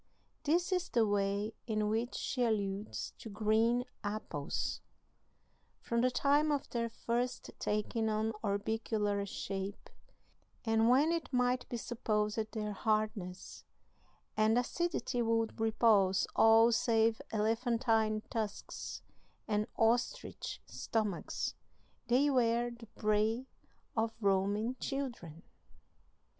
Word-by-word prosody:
This 345 +5 +2
is 360 -1 0
the 230 -2 +3
way 205 +1 0
in 215 -2 0
which 225 +3 -1
she 250 -2 -1
alludes 200 - -1
to 225 - -8
green 220 +3 +2 0.2
apples: 205 -9 -3 1.0
"From 235 0 0
the 255 - +4
time 290 +4 +3
of 285 -2 -1
their 235 -1 -1
first 240 +2 -2
taking 220 +1 0
on 220 +1 0
orbicular 205 0 -1
shape, 195 +1 -5 0.7
and 225 0 +3
when 280 +6 +5
it 335 -4 -2
might 250 -1 +1
be 240 - -3
supposed 215 -2 -1
their 210 -2 -2
hardness 215 -4 -2 0.7
and 215 +2 +3
acidity 250 -1 -1
would 225 -1 0
repulse 215 -4 +4
all 225 +1 +7
save 225 -1 +2
elephantine 225 0 +1
tusks 220 -3 -4 0.4
and 210 0 0
ostrich 230 +2 0
stomachs, 210 -5 -2 0.5
they 255 +4 +4
were 240 -1 +2
the 235 -1 -11
prey 215 +4 +1 0.5
of 225 0 0
roaming 205 +4 +1
children." 240 - -4
225 Hz, 105 wpm, -33 LUFS, 210-240 Hz, 1.0 s, all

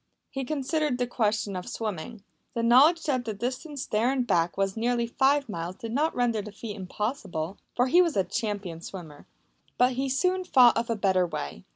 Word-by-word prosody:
He 270 -1 -3
considered 300 -1 -1
the 250 - 0
question 215 -4 -1
of 180 0 -5
swimming. 215 0 -5 0.3
The 230 - -1
knowledge 285 +8 +6
that 260 -5 0
the 220 -3 -4
distance 255 +6 -4
there 225 +4 +1
and 260 -2 0
back 170 -5 +1
was 195 -1 0
nearly 235 +1 0
five 275 +4 +2
miles 170 -3 -5
did 225 +2 -7
not 300 +6 0
render 235 -3 +1
the 210 +1 -9
feat 210 +1 -7
impossible, 195 - -4 0.2
for 250 - +3
he 345 +8 +5
was 335 - +1
a 195 - +4
champion 205 -7 -4
swimmer. 165 -6 -10 0.5
But 250 +1 +4
he 265 +2 -1
soon 365 +7 +1
thought 255 -9 +6
of 230 +1 -1
a 230 - +1
better 190 -3 +2
way. 70 - -6
235 Hz, 195 wpm, -27 LUFS, 195-265 Hz, 0.5 s, knowledge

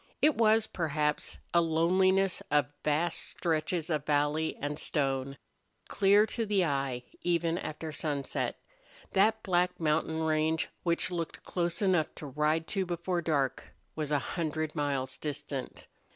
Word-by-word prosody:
It 305 - +5
was, 225 -1 +4
perhaps, 150 -5 -1 0.2
a 170 - +6
loneliness 185 +4 +2
of 145 -1 +2
vast 155 +3 +1
stretches 165 0 -1
of 150 -3 0
valley 150 +2 +1
and 145 +1 -3
stone, 135 -2 -1 0.5
clear 205 +1 +5
to 230 +1 -3
the 200 -4 +2
eye, 135 -4 -1 0.2
even 170 -1 +1
after 155 +1 -5
sunset. 145 -2 -2 0.5
That 220 +3 +3
black 180 -1 +1
mountain 160 0 0
range, 160 0 +1
which 170 +1 +1
looked 170 -2 -4
close 175 +1 -1
enough 180 -5 +2
to - - -8
ride 150 +3 0
to 195 -2 0
before 175 0 -2
dark, 145 -5 0 0.3
was 155 -2 -2
a 150 - +3
hundred 155 +1 -2
miles 140 -4 -1
distant. 145 -3 -5
160 Hz, 135 wpm, -30 LUFS, 150-175 Hz, 0.5 s, a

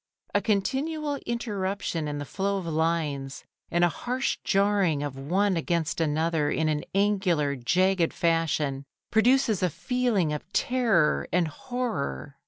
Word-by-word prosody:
A - - +3
continual 285 +8 -1
interruption 200 -8 -2
in 145 0 -3
the 145 - -4
flow 200 +5 -1
of 190 - -5
lines, 155 -4 -1 0.3
and 175 0 +2
a - - +6
harsh 250 +9 -2
jarring 195 -7 +2
of 145 -2 -4
one 185 +9 +1
against 165 -1 -1
another 160 0 +1
in 160 +1 0
an 150 -1 -1
angular, 190 -8 +2
jagged 180 +7 +2
fashion, 160 -5 0 0.3
produces 230 -2 +3
a 180 - +2
feeling 220 - 0
of 150 +5 -6
terror 225 -11 +2
and 175 -2 +2
horror. 240 - -4
175 Hz, 135 wpm, -27 LUFS, 155-210 Hz, 0.3 s, a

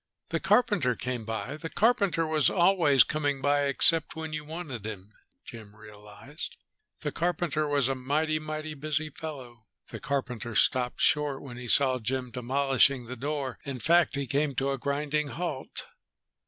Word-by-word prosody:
The - - -1
carpenter 205 - +2
came 125 -2 -4
by. 115 +6 -4
The 165 +1 -6
carpenter 200 -7 +2
was 155 -2 +3
always 170 - +5
coming 145 0 -1
by, 145 +1 +2
except 160 +4 +4
when 160 -1 -5
you 155 0 -3
wanted 150 - -7
him, 105 -1 -8 0.3
Jim 110 -3 -11
realized. 105 +7 -10 0.4
The 150 - -2
carpenter 170 -3 -1
was 140 -3 +2
a 135 - +1
mighty, 150 +4 0
mighty 155 0 -5
busy 155 +1 -3
fellow. 130 -8 -9 0.2
The - - -7
carpenter 125 -5 -3
stopped 125 +3 +2
short 145 -2 +2
when 125 -3 -9
he 125 0 -7
saw 130 +1 +3
Jim 125 +2 -3
demolishing 130 +1 +2
the 125 +2 -6
door. 140 0 -3
In 140 -2 -5
fact 170 +2 +3
he 140 0 -2
came 140 +1 0
to 135 +2 0
a 135 - -3
grinding 145 +2 -1
halt. 150 -3 -5
140 Hz, 160 wpm, -28 LUFS, 125-155 Hz, 0.4 s, always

